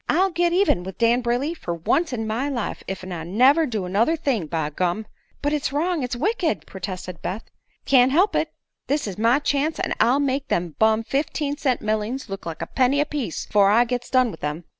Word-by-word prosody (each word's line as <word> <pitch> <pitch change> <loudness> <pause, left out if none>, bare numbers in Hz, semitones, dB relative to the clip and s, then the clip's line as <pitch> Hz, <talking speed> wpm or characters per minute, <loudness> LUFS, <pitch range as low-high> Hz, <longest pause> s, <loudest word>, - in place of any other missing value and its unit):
"I'll 375 +4 +3
git 345 +1 +1
even 360 - +3
with 190 +1 -8
Dan 235 +1 +3
Brayley 245 +6 0
fer 175 - -5
once 310 - 0
in 225 -3 -3
my 230 +6 -1
life, 240 -6 -3
ef 190 -1 -5
I 175 -3 -5
never 260 - +4
do 215 -7 -3
another 215 - +2
thing, 265 - -1
by 155 -2 -2
gum!" 180 +7 -1 0.4
"But 290 +1 +1
it's 295 -3 -1
wrong 325 +3 0
it's 250 -1 -2
wicked!" 345 - -1
protested 185 -2 -7
Beth. 205 +5 -4 0.4
"Can't 255 -1 +5
help 365 +9 +3
it; - - 0 0.4
this 290 +1 0
is 200 -2 -6
my 230 +4 +4
chance, 290 +2 0
an' - - -1
I'll 250 +4 +4
make 275 0 -1
them 170 -2 -1
bum 220 0 +3
fifteen 285 +3 -1
cent 270 -4 -1
mellings 215 +4 -2
look 195 -3 -6
like 165 -1 -5
a - - -3
penny 265 +2 +1
a 295 - +3
piece 285 - -4
afore 200 -1 +4
I 230 +4 +5
gits 245 0 -3
done 255 -3 +3
with 160 - -12
'em." 150 +3 -3
245 Hz, 215 wpm, -23 LUFS, 195-290 Hz, 0.4 s, Can't